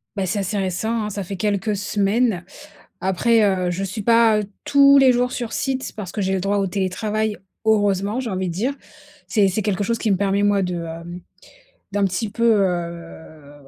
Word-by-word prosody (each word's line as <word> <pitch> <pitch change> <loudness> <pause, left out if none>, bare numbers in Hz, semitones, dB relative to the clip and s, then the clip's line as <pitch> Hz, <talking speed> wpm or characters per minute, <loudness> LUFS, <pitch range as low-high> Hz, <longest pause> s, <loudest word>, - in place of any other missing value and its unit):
Bah, 195 -2 -1
c'est 180 - -1
assez 200 +2 -2
récent, 215 +4 -1
hein, 210 - -3
ça 200 -1 -4
fait 195 +1 -6
quelques 205 +2 0
semaines. 205 -1 0 0.5
Après, 205 +5 +2
heu, 185 -3 +1
je 180 - -3
suis 195 +3 -4
pas, 230 0 +4
heu, - - -2 0.2
tous 280 0 +6
les 265 -2 +6
jours 250 +1 +1
sur 240 -3 -4
site, 265 -2 -2
parce 195 -4 -6
que 215 - -5
j'ai 190 0 0
le 190 - 0
droit 200 +1 0
au 195 -1 0
télétravail, 210 +3 -2 0.3
heureusement, 205 +1 +1
j'ai 250 - -3
envie 185 -2 -2
de - - -4
dire. 235 +10 -1 0.5
C'est 205 -4 +3
c'est 195 +3 -1
quelque 200 -1 -1
chose 230 +1 0
qui 220 -3 0
me 190 - +2
permet 200 +1 +1
moi 205 -1 +3
de, 180 -1 -2
hem, 170 +2 -8 0.7
d'un 205 0 0
petit 195 +4 -2
peu, 230 +3 -3 0.2
heu, 160 - -5
200 Hz, 200 wpm, -21 LUFS, 185-220 Hz, 0.7 s, tous